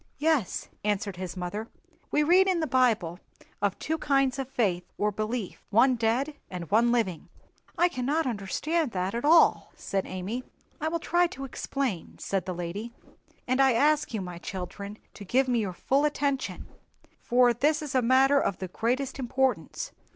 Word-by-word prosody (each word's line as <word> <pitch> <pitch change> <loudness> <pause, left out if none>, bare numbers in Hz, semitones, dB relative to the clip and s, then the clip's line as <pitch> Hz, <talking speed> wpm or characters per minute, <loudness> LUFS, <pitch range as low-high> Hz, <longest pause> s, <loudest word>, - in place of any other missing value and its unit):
"Yes," 300 - 0 0.2
answered 205 -2 -1
his 185 0 -6
mother; 205 +5 -4 0.4
"we 300 - +2
read 365 +5 +5
in 370 -3 +2
the 320 - 0
Bible 230 - +2 0.4
of 200 -2 0
two 320 +1 -2
kinds 275 -2 +2
of 265 -1 -3
faith 190 -9 0
or 210 0 +1
belief—one 225 +3 +1
dead 240 +6 0 0.2
and 175 -2 -7
one 235 +3 +4
living." 215 -9 -1 0.5
"I 350 - +5
cannot 295 +1 -1
understand 255 - -1
that 185 +1 -1
at 235 - -2
all," 325 +3 +5
said 195 -1 -3
Amy. 195 +7 -4 0.4
"I 315 - -1
will 330 +1 0
try 345 +2 +2
to 270 -4 -7
explain," 260 - -3
said 195 -2 -2
the 185 - -3
lady 180 +7 -5 0.6
"and 255 +2 +2
I 265 -2 +5
ask 295 +5 +3
you, 220 -4 -2
my 180 -2 -7
children, 200 +3 -6 0.2
to 205 - -10
give 255 +7 +2
me 245 -2 +2
your 200 -4 -1
full 270 +10 +1
attention, 285 -2 -1 0.5
for 245 0 +4
this 295 +6 +1
is 290 - -5
a 260 - +3
matter 265 +3 +5
of 200 - -1
the 185 - -5
greatest 255 +7 -1
importance. 265 - -1
245 Hz, 170 wpm, -28 LUFS, 200-280 Hz, 0.6 s, read